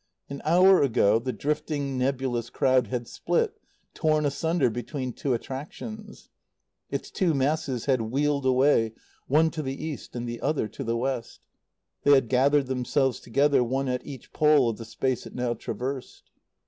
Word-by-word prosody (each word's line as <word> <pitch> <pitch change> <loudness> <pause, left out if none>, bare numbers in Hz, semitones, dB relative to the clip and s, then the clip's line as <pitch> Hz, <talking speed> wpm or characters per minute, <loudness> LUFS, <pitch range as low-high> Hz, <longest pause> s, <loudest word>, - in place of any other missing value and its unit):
An 140 - -6
hour 185 +4 +6
ago 110 -5 +3
the 130 +2 -3
drifting, 145 +2 -2
nebulous 125 -2 -1
crowd 130 -1 +2
had 120 -2 -3
split, - - -1 0.3
torn 155 -1 +1
asunder 145 -2 +1
between 125 +2 -4
two 130 +1 -1
attractions; 205 - -8 0.6
its - - -4
two 175 -6 +1
masses 135 -3 0
had 130 -4 +2
wheeled 140 +4 0
away, 130 -4 +3 0.3
one 160 +4 +3
to 160 - -4
the 135 -2 -3
east 155 -5 -6
and 120 0 -4
the 120 0 -5
other 150 -8 0
to - - -7
the 115 +1 -1
west; 125 -1 -3 0.6
they 145 - +5
had 135 -4 +2
gathered 140 +2 +3
themselves 130 +1 0
together, 140 +2 +2
one 135 +3 -1
at 125 0 -2
each 135 -4 -10
pole 150 -5 +4
of 110 - -8
the 115 - -7
space 125 +2 -2
it - - -13
now 125 -1 0
traversed. 130 +3 -6
135 Hz, 160 wpm, -26 LUFS, 125-145 Hz, 0.6 s, hour